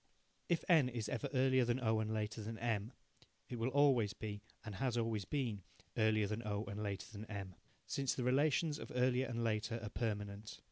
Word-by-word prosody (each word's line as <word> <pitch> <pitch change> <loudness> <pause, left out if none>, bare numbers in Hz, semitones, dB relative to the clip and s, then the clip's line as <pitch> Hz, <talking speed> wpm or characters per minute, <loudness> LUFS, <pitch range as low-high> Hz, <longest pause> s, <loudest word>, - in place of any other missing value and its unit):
If 170 -2 +2
N 155 -8 +6
is 115 -4 -3
ever 140 - -2
earlier 130 -1 +4
than 120 +1 +1
O 110 -3 +2
and 110 0 -1
later 110 0 -2
than 110 +2 -5
M, 115 -1 -1 0.6
it 120 - -4
will 115 +3 +1
always 130 -7 +4
be, 105 -2 -5 0.2
and 110 - -5
has 120 +4 0
always 115 -4 0
been, 115 -4 -1 0.3
earlier 110 -1 +3
than 105 +3 -2
O 105 -2 -2
and 100 +1 -4
later 100 -2 -2
than 105 0 -7
M, 100 -3 -5 0.3
since 135 -2 0
the 125 - -1
relations 145 +4 +3
of - - -7
earlier 125 +1 +3
and 120 -1 -2
later 115 +1 0
are 105 - -3
permanent. 105 -2 -3
115 Hz, 195 wpm, -38 LUFS, 105-130 Hz, 0.6 s, N